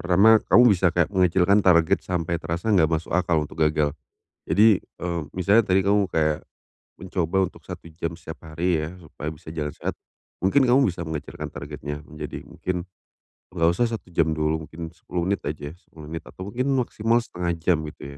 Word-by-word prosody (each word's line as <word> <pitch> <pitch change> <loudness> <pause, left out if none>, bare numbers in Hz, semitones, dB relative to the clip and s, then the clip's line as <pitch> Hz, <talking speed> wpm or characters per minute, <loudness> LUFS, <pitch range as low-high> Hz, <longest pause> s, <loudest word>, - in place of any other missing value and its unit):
pertama, 100 +5 +5
kamu 120 - +7
bisa 95 -1 +3
kayak 85 +2 0
mengecilkan 95 +2 +4
target 85 -4 +4
sampai 85 -2 -2
terasa 85 +7 -2
nggak 85 -6 +4
masuk 80 0 -2
akal 85 -3 +2
untuk 80 - -10
gagal. 75 -2 +2 0.6
Jadi, 105 +4 +5
eee, 85 -1 -5
misalnya 100 +5 +4
tadi 95 +1 +3
kamu 100 0 +3
kayak 80 -3 0 0.6
mencoba 90 -1 -1
untuk - - -18
1 85 - -8
jam 85 +1 -4
setiap 80 - -10
hari 85 +2 0
ya 80 +3 -5
supaya 80 -4 -9
bisa 80 +1 -7
jalan 75 -2 -4
sehat, - - -3 0.5
mungkin 115 +10 +3
kamu 130 +1 +4
bisa 85 -1 -3
mengecilkan 80 -2 -6
targetnya 75 +1 -6
menjadi 75 -2 -7
mungkin 90 -1 -4 0.7
nggak 85 -1 +3
usah 115 +7 +1
1 110 -6 -6
jam 80 -2 +1
dulu, 80 0 -1
mungkin 80 0 -8
10 85 +1 -4
menit 100 +2 0
aja, 75 -1 -5
10 80 -4 -13
menit 80 - -6
atau 95 +2 -8
mungkin 130 +5 -1
maksimal 115 -2 +1
1/2 90 -6 -3
jam 85 +1 +1
gitu 70 -1 -9
85 Hz, 180 wpm, -24 LUFS, 80-95 Hz, 0.7 s, kamu